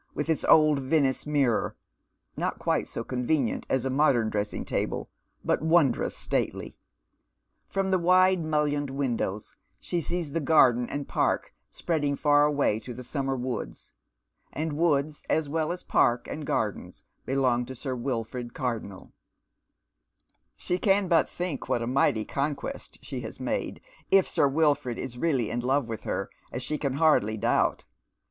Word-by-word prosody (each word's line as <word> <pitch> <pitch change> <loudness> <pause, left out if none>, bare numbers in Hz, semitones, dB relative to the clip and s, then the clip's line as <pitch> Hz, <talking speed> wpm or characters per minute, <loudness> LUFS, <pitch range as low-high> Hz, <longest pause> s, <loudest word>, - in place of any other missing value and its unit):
h 150 - -1
its 160 - +1
old 155 -2 +5
Venice 135 0 +1
mirror, 140 -7 +1 0.6
not - - -2
quite - - 0
so - - -4
convenient 125 0 -1
as 130 -1 0
a - - 0
modern 130 -6 +3
dress 105 0 -1
ing - - -5
table, - - -2 0.3
but - - +1
wondrous 160 -5 +2
stately. - - -2 0.9
From 195 -1 -1
the 185 - +3
wide 185 0 +4
mullioned 150 -2 0
window 125 -7 -1 0.4
she 175 - -2
sees 170 -2 -2
the 165 - 0
garden 130 -6 +4
and 145 0 -4
park - - 0 0.2
spreading 145 -4 -1
far 145 0 +4
away 145 -7 +1
to 125 +1 -8
the 125 - -8
summer 135 +1 -2
woods, 125 -2 -5 0.6
and 155 0 -3
woods 150 -2 +1
as 160 -2 +1
well 155 +2 -1
as 180 - -5
park 120 0 +2
and 155 -1 -6
gardens 110 -6 -2 0.2
belong 130 -2 +2
to 130 - -7
Sir 130 +1 -4
Wilford 120 -1 -4
Cardonnel, 115 -6 -4 1.5
She 180 +1 -2
can 195 0 +2
but 165 -2 +3
think 175 -6 -4
what 120 - +1
a - - -2
mighty 120 -3 +2
conquest 145 - -4
she - - -5
has - - -7
made, - - -3 0.3
if 195 -1 +5
Sir 145 - +2
Wilford 145 -4 +1
is 125 -1 -6
really 135 -9 +1
in 120 - -1
love 130 +2 +1
with 115 -3 -6
her, - - -2 0.2
as 125 - -4
she 150 +3 -2
can 140 -3 -1
hardly 140 -8 +3
doubt. - - +1
140 Hz, 155 wpm, -27 LUFS, 125-155 Hz, 1.5 s, old